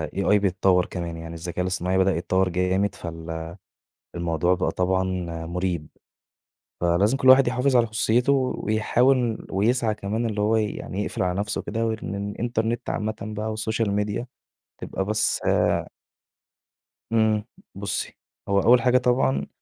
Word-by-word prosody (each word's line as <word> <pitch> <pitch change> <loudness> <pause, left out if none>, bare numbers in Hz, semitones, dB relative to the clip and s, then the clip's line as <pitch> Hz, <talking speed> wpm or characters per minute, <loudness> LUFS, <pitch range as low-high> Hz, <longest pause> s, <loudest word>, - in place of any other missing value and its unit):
AI 100 +1 +3
بيتطوَّر 95 -2 +2
كمان، 85 -2 -5
يعني 80 0 -8
الذَّكاء 85 +1 -4
الاصطناعي 90 0 -1
بدأ 95 0 +3
يتطوَّر 95 +2 +1
جامد، 90 +2 0
فال 80 -1 -6 0.6
الموضوع 85 +1 +1
بقى - - -1
طبعًا 95 0 +1 0.4
مريب، 85 -2 -2 0.9
فلازم 90 +8 +2
كُلّ 130 -1 +3
واحد 130 0 +7
يحافظ 130 +2 +1
على 120 -1 +4
خُصُوصِيَّتُه، 115 +4 +2 0.3
ويحاول 120 +2 +1
ويسعى 110 +3 +1
كمان 105 +4 -2
اللي 105 -2 -2
هو 105 +2 +2
يعني 105 -2 -2
يقفل - - -2
على 90 +1 -1
نفسه 105 +1 -2
كده، 115 0 -2
وإن 110 -3 -3
الإنترنت 115 +3 -2
عامةً 110 0 -2
بقى 110 +1 -4
والسوشيال 110 0 -1
ميديا 105 +4 -2 0.5
تبقى 95 - -3
بس 105 +1 +1
آآ - - +2 1.2
امم. 110 -2 +2 0.3
بُصي - - -3 0.3
هو 100 0 +3
أوّل 120 +4 +5
حاجة 125 +1 +4
طبعًا، 120 - +1
105 Hz, 140 wpm, -24 LUFS, 90-115 Hz, 1.2 s, واحد